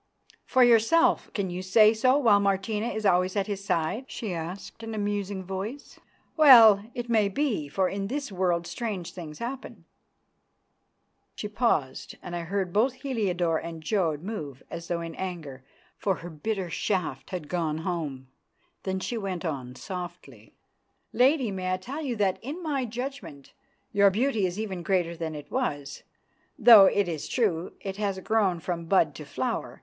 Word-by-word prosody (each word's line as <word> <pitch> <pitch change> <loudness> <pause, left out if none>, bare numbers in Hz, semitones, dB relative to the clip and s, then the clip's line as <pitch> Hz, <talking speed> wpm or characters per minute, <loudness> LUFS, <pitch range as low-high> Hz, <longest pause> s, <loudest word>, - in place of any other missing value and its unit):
"For 260 - +4
yourself! 240 +7 +4
Can 195 -3 -1
you 180 +1 -4
say 215 +4 +5
so 255 +5 +3
while 225 -8 +5
Martina 200 +3 0
is 220 -3 -3
always 185 0 +3
at 200 -1 +1
his 200 -1 -4
side?" 200 +7 -1
she 215 -8 -5
asked 175 +6 -7
in 225 -1 -6
a - - -5
musing 205 -2 -2
voice. 195 +9 -6 0.4
"Well, 230 -10 +8
it 240 0 -4
may 220 -4 +3
be, 215 - -1
for 185 +6 0
in 195 +1 -3
this 275 +1 -4
world 180 -2 0
strange 205 -5 -4
things 155 -4 -8
happen." 255 +3 -7 1.5
She 210 - -4
paused, 205 - -1
and 175 - -6
I - - -2
heard 180 +1 -2
both 235 +5 +3
Heliodore 180 - 0
and 165 -1 -8
Jodd 165 -5 0
move 150 - -6
as 170 0 -6
though 170 -1 -2
in 165 -1 -6
anger, 160 -9 -6 0.4
for 195 -2 +1
her 175 +1 -9
bitter 185 +3 -3
shaft 185 0 -2
had 175 -5 -5
gone 160 -3 -1
home. 160 -6 -4 0.6
Then 190 0 -2
she 230 +4 -3
went 190 -3 -4
on 130 -6 -4
softly, 175 - -8 0.6
"Lady, 255 -1 +3
may 185 -1 -2
I - - 0
tell 265 +11 -6
you 265 -6 -2
that, 195 -3 +1
in 300 +9 -6
my 280 -5 -1
judgment, 230 - -7 0.4
your 200 -1 +6
beauty 220 -1 +1
is 180 +3 -5
even 195 -5 -4
greater 175 -2 0
than 160 -1 -4
it 145 -1 -9
was, 145 - -3 0.6
though 225 -5 +9
it 200 -1 +2
is 160 -4 -4
true 185 -8 0
it 195 -1 -5
has 200 -2 -1
grown 200 -5 +1
from 170 0 -4
bud 165 -4 +3
to 150 - -9
flower. - - -3
195 Hz, 170 wpm, -27 LUFS, 170-220 Hz, 1.5 s, though